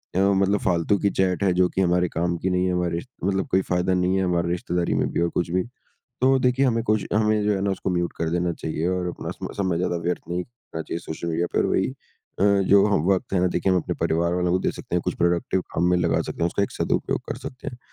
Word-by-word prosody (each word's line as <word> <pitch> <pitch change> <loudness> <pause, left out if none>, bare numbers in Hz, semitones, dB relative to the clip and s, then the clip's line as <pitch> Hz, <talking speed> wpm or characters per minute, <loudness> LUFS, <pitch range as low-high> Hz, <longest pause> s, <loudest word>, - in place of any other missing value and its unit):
अ, - - +2
मतलब 100 +1 +3
फ़ालतू 90 +2 +1
की - - +5
चैट 95 +1 +1
है, 95 - +3
जो 90 0 +3
कि 95 - -1
हमारे 90 0 +2
कम 85 0 0
की 95 - -1
नहीं 90 0 +1
है 90 - 0
हमारे 85 -1 0 0.2
मतलब 95 0 0
कोई 95 - +5
फ़ायदा 90 +1 +1
नहीं 90 +1 +1
है, 95 - +1
हमारे 85 -1 0
रिश्तेदारी 90 0 -1
में - - +1
भी - - -1
और 85 - +2
कुछ 85 - -2
भी, 90 +1 +1 0.6
तो 135 +1 +4
देखिए, 125 +1 +2
हमें 115 -2 +1
कोशि 110 -3 +1
हमें 105 0 +2
जो 105 0 +2
है 95 - -2
ना 100 - +1
उसको 95 - -2
म्यूट 85 -1 -1
कर 80 0 -1
देना 85 0 0
चाहिए 80 0 -3
और 90 -1 -1
अपना 90 - -5
सम - - -6
समय 95 -4 0
ज़्यादा 90 0 0
व्यर्थ 90 0 -1
नहीं 90 +1 -1
करना 120 -9 -9
चाहिए 85 - -4
सोशल 85 0 -5
मीडिया 85 +1 0
पर। - - +3
वही - - +1
अ, 95 - -7 0.2
जो 100 0 +6
हम 100 -7 +2
वक़्त 95 -1 0
है 95 - +2
ना, 90 - +3
देखिए 90 +1 +1
हम 90 - +3
अपने - - -3
परिवार 85 +2 +1
वालों 90 0 0
को 90 - +3
दे - - 0
सकते - - -7
हैं, - - +2
कुछ - - -1
प्रोडक्टिव 85 +2 +1
काम 85 - +1
में 90 - +4
लगा - - +1
सकते - - -5
हैं, - - +4
उसका 95 +3 -1
एक - - -1
सदुपयोग - - -1
कर - - -3
सकते 130 - -7
हैं। 125 - -10
90 Hz, 270 wpm, -24 LUFS, 85-95 Hz, 0.6 s, जो